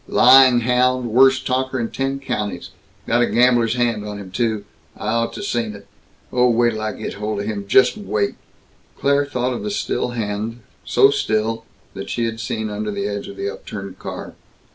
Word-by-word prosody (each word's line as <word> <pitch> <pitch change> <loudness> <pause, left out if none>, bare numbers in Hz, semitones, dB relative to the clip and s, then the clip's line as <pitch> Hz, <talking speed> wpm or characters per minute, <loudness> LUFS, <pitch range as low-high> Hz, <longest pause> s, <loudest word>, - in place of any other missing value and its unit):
Lying 130 -1 +7
hound 125 0 +1
worst 130 +2 +5
talker 130 0 -1
in 115 -1 -3
ten 135 0 -2
counties! 105 -8 -4 0.3
Got 120 - +2
a 120 - +3
gambler's 120 -2 +3
hand 120 -4 0
on 105 0 -6
him, 95 -2 -9
too 110 0 -1 0.3
I 105 - -4
ought 115 +1 0
to 205 - -6
seen 115 - -2
it! 100 0 -13 0.5
Oh, 125 0 +4
wait 120 0 +3
till 110 -1 -5
I 110 -1 -2
get - - -6
hold 105 0 -3
of - - -5
him; 100 -2 -4
just 130 - +4
wait!" 105 - -1 0.6
Claire 140 0 +2
thought 125 -2 -1
of 120 - -4
the - - -3
still 205 - -1
hand 115 0 -4 0.2
so - - +4
still 110 +1 -1 0.3
that 95 - -7
she 120 - -1
had 115 0 -4
seen 110 -1 -3
under 105 +1 -3
the 100 -1 -3
edge 100 -1 -4
of - - -10
the 395 +1 -3
upturned - - -8
car. - - -7
115 Hz, 195 wpm, -20 LUFS, 105-125 Hz, 0.6 s, Lying